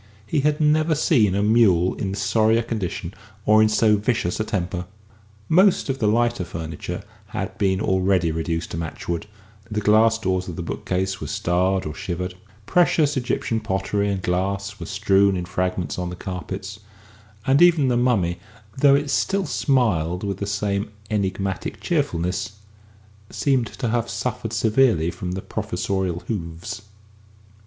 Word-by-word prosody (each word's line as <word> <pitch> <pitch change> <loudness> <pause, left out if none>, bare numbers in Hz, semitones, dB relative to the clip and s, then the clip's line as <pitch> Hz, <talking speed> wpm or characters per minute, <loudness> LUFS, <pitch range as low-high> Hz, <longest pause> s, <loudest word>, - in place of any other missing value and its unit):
He 145 - 0
had 150 +1 +1
never 155 +1 +3
seen 115 - +3
a 100 - +1
mule 105 -5 +4
in 95 -1 -3
sorrier 110 +2 +2
condition 110 -7 -4 0.3
or 110 +1 +6
in 110 - +5
so 110 0 +4
vicious 105 -4 -1
a - - +1
temper. 90 -4 -3 0.6
Most 185 -1 +4
of 135 0 -1
the 110 - +2
lighter 120 -1 +2
furniture 80 -2 -6 0.2
had - - -4
been 95 -2 +2
already 95 -4 +2
reduced 80 +1 -3
to - - -4
matchwood; 85 +3 -4 0.4
the 105 -1 -1
glass 110 +2 +4
doors 95 -4 -1
of 90 - -5
the 85 - -4
bookcase 95 +3 -2
were - - -4
starred 95 +2 0
or 75 - -4
shivered; 90 +3 -4 0.3
precious 160 -3 +3
Egyptian 120 -3 -1
pottery 100 -1 -1
and 95 -2 -2
glass 100 +3 -1
were - - -6
strewn 100 -1 +3
in 90 - -3
fragments 90 0 -2
on 90 -1 -2
the 90 - -6
carpets, 95 +3 -6 0.7
and 135 +4 +4
even 170 -6 +6
the 125 - +2
mummy, 110 -9 +1 0.4
though 140 0 +6
it 145 0 0
still 195 +6 +1
smiled 95 - +1
with 100 -2 -2
the 100 - -4
same 100 0 -1 0.2
enigmatic 95 -2 -2
cheerfulness, 90 +5 -1 0.8
seemed 130 -5 +1
to 115 - -4
have 120 0 0
suffered 115 -3 -3
severely 110 -6 +2
from 90 0 -5
the 95 - -5
Professorial 95 -3 -2
hoofs. 90 +1 -5
100 Hz, 150 wpm, -23 LUFS, 90-115 Hz, 0.8 s, or